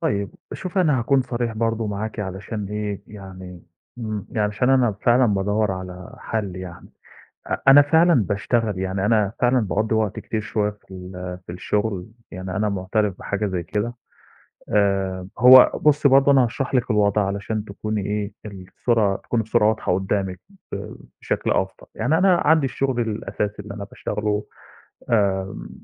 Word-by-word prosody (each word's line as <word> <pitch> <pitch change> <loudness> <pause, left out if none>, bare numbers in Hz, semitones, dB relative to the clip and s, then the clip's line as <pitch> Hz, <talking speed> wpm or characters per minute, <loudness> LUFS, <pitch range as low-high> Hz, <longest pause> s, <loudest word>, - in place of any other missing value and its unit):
طيب، 100 -1 -1 0.2
شوفي 185 +1 -2
أنا 150 -7 +3
هاكون 130 +3 +2
صريح 120 -2 -3
برضه 115 0 -1
معاكِ 105 +1 -4
علشان 100 +2 -5
إيه، 105 -1 -4
يعني 95 -3 -10 0.4
امم، 110 -3 -4
يعني 110 - -2
علشان 105 +5 0
أنا 125 -5 +4
فعلًا 120 +1 +4
بادوّر 105 +1 0
على 90 -1 -8
حَل 100 -5 -3
يعني. 90 -2 -9 0.6
أ - - -1
أنا 140 +2 +10
فعلًا 165 +4 +4
باشتغل، 105 +1 -1
يعني 95 +1 -1
أنا 105 -2 +2
فعلًا 125 +1 +3
باقضّي 110 +1 0
وقت 110 -2 0
كتير 110 - -3
شوية 105 0 -1
في 105 -1 -21
ال 90 0 -7
في - - -6
الشُغل، 100 +1 -2 0.2
يعني 95 0 -6
أنا 105 +2 +1
مُعترف 100 0 -1
بحاجة 105 +1 -2
زي 90 -3 -3
كده. 105 +7 -2 0.8
آآ 95 -2 0
هو 125 +2 +8
بُصّي 150 -1 +4
برضه 135 +1 +5
أنا 130 -2 +5
هاشرح 125 +3 -3
لِك 125 -1 +1
الوضع 105 -1 +2
علشان 100 +2 -3
تكوني 105 0 -4
إيه، 105 0 -2
الصورة 100 +2 -1
تكون 115 +3 -2
الصورة 110 -1 +2
واضحة 110 -4 0
قُدّامِك 95 0 -2 0.3
ب - - -6 0.3
بشكل - - -1
أفضل. - - -1
يعني 160 +2 +1
أنا 185 -1 +5
عندي 155 -2 +4
الشُغل 130 -1 -1
الأساسي 105 -2 -3
اللي 100 -1 -8
أنا 100 -1 -6
باشتغله 105 +1 -3 0.7
آمم، 95 -4 0
105 Hz, 160 wpm, -22 LUFS, 95-115 Hz, 0.8 s, أنا